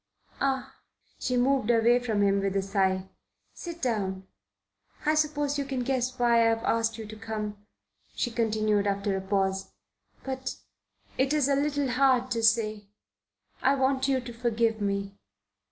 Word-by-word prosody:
Ah!" 265 -1 -1 0.4
She 250 -1 0
moved 255 -2 +2
away 235 +1 +4
from 220 -4 0
him 200 0 +3
with 195 0 -1
a 195 - +2
sigh. 190 -1 0 0.4
"Sit 340 -2 -8
down. 195 -6 -1 0.8
I 305 - +4
suppose 295 -2 0
you - - 0
can 265 -2 -2
guess 255 0 -1
why 235 -2 +4
I've 225 0 -2
asked 225 -1 +1
you 220 - -6
to 215 +1 -9
come," 210 -2 -6 0.5
she 240 - -1
continued 215 -3 +1
after 200 0 0
a 190 - -2
pause. 190 0 -1 0.5
"But 260 -1 -4 0.6
it 270 +2 +2
is 295 -3 +3
a 280 - +3
little 285 -1 0
hard 255 0 +3
to 230 -1 0
say. 215 -2 +2 0.7
I 270 +1 +4
want 265 0 +1
you 270 -1 +2
to 240 -1 -8
forgive 230 -2 0
me." 200 0 -2
230 Hz, 155 wpm, -28 LUFS, 205-265 Hz, 0.8 s, away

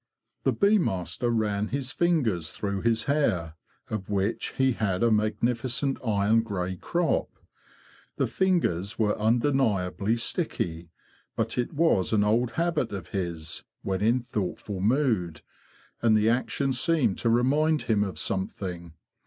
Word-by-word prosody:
The - - +4
bee 205 +1 +3
master 95 - -1
ran 105 -3 0
his 130 0 -3
fingers 120 - +1
through 100 +1 -3
his 115 -1 +1
hair, 95 - 0 0.3
of 105 -3 -5
which 100 +2 -1
he 130 0 +2
had 100 -5 -1
a 115 - +4
magnificent 120 +5 0
iron 110 0 +3
grey 95 -4 -3
crop. 170 - 0 0.9
The - - +1
fingers 135 - 0
were 105 -2 +2
undeniably 110 -3 +1
sticky; 85 - -2 0.5
but 115 0 -1
it 120 - -2
was 145 - +2
an 105 -1 +4
old 115 +3 +1
habit 165 -7 0
of 100 -2 -6
his, 85 -5 -4 0.2
when 95 0 -2
in 115 +4 +3
thoughtful 105 -4 -4
mood, 105 - +1 0.6
and 110 -2 +4
the 110 +1 +3
action 130 +3 0
seemed 130 - +1
to 115 - +1
remind 145 +6 +2
him 105 -2 +2
of 100 -2 -5
something. 90 -3 -4
110 Hz, 135 wpm, -27 LUFS, 95-130 Hz, 0.9 s, The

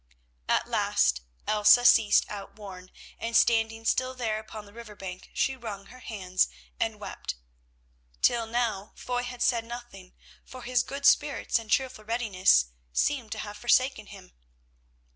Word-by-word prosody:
At - - +2
last 60 +1 +1 0.2
Elsa 215 +3 +5
ceased 215 -3 +6
outworn, 195 -2 -9 0.3
and, 230 0 +1
standing 225 -1 +2
still 255 +2 +1
there 225 -4 -2
upon 215 -1 -10
the 200 - -16
river 230 -2 -11
bank 185 -2 -8
she 265 - 0
wrung 215 -6 -7
her 255 +4 -14
hands 185 -6 0 0.3
and - - -1
wept. - - -6 0.9
Till 230 -1 +3
now 225 -4 -2
Foy 245 0 -3
had 245 0 -4
said 235 -2 +2
nothing, 235 -6 -10 0.3
for 255 -1 -11
his 245 0 +2
good 280 +1 -6
spirits 290 -5 +3
and 225 -1 -11
cheerful 255 -3 0
readiness 190 - +2 0.2
seemed 240 - 0
to - - -7
have 205 0 -8
forsaken 255 -2 +2
him. 190 -3 -13
225 Hz, 145 wpm, -28 LUFS, 200-245 Hz, 0.9 s, ceased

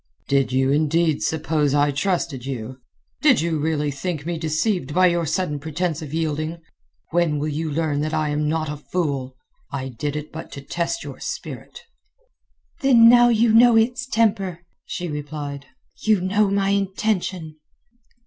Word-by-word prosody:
"Did 135 -2 +2
you 130 +1 +2
indeed 155 +1 +2
suppose 155 -2 0
I 145 0 +3
trusted 150 -3 -1
you? 130 -1 -6 0.4
Did - - +5
you 160 -1 0
really 150 -1 0
think 150 +1 -4
me 170 -1 -3
deceived 160 -1 -1
by 185 0 +5
your 170 -2 +2
sudden 155 -2 -1
pretence 160 +2 -2
of 150 -3 -7
yielding? 160 +1 -2 0.5
When 170 -3 +2
will 150 +2 -2
you 155 +2 -2
learn 150 -1 0
that 155 +1 -2
I 155 -1 0
am 150 0 0
not 160 0 -1
a 150 0 -4
fool? 140 -5 -3 0.3
I 130 -2 -4
did 145 +4 -4
it 150 0 -5
but 160 - -8
to 140 - -7
test 175 - -2
your - - -8
spirit." - - -7 1.0
"Then 245 -6 +7
now 240 0 +7
you 230 -1 +3
know 235 +1 +7
its 245 +4 +2
temper," 200 -8 0 0.2
she 175 - -4
replied. 145 -2 -6 0.3
"You 215 -2 +3
know 200 +3 +2
my 195 0 +1
intention." 190 -5 -1
160 Hz, 160 wpm, -22 LUFS, 145-185 Hz, 1.0 s, Then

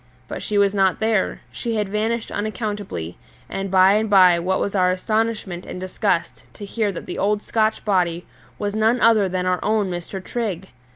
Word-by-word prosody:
But - - -6
she 210 - -2
was 200 0 +3
not 190 -2 +2
there 220 -3 0
she 230 -1 -3
had 210 -2 0
vanished 220 +3 -2
unaccountably; 205 - -4 0.3
and 195 0 -4
by 190 +1 +5
and 215 +1 +1
by 185 -3 +6
what 190 +2 0
was 200 - -2
our 185 -2 +3
astonishment 210 -1 -1
and - - -7
disgust 185 -1 -1
to 205 - -8
hear 210 0 -1
that 185 - -7
the - - -6
old 205 +1 +1
Scotch 220 -1 0
body 180 -4 +1 0.3
was 205 +5 -3
none 220 +3 +2
other 220 -5 +4
than 180 0 -2
our 185 0 +1
own 210 -3 +1
Mr. 175 +2 -5
Trigg! 190 -3 -4
200 Hz, 185 wpm, -22 LUFS, 185-215 Hz, 0.3 s, by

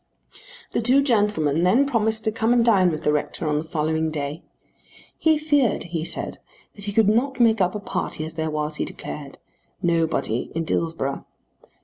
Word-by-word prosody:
The - - 0
two 260 +4 +4
gentlemen 205 - +2
then 195 +11 +4
promised 220 -4 +1
to 220 - +1
come 225 +2 +1
and 235 -1 +3
dine 195 -6 +5
with 155 -2 -4
the 150 - +3
rector 150 +2 -2
on 150 0 +1
the - - -4
following 160 0 -1
day. 150 +1 -4 0.7
He 315 -1 +3
feared 290 -6 +1
he 165 -2 -4
said - - -5 0.3
that 205 - -11
he 205 - -2
could 220 0 +3
not 250 +5 +1
make 225 -3 +4
up 180 +2 +1
a - - -2
party 155 -5 -3
as 160 - -7
there 160 -1 -2
was, 150 0 -2
he - - -1
declared, 145 -2 -8 0.4
nobody 165 - 0
in 165 - 0
Dillsborough. 160 -4 -2
180 Hz, 185 wpm, -23 LUFS, 155-225 Hz, 0.7 s, dine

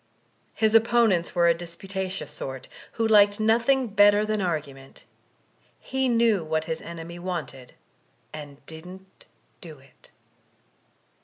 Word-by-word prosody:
His 220 -1 +1
opponents 225 -6 +3
were 170 -1 +4
a 170 - +5
disputations 185 +3 -6
sort, 130 -1 -7 0.3
who 225 -1 0
liked 205 -1 +5
nothing 235 +5 +2
better 205 -1 +4
than 215 -1 -1
argument; 145 -6 -5 0.8
he 265 -1 -1
knew 230 -6 +2
what 155 0 -2
his 160 -1 -4
enemy 170 +1 -9
wanted 160 -8 -6 0.6
and 145 -2 -10
didn't 180 +4 -13 0.3
do 160 -4 -11
it. 135 0 -22
185 Hz, 120 wpm, -25 LUFS, 160-215 Hz, 0.8 s, a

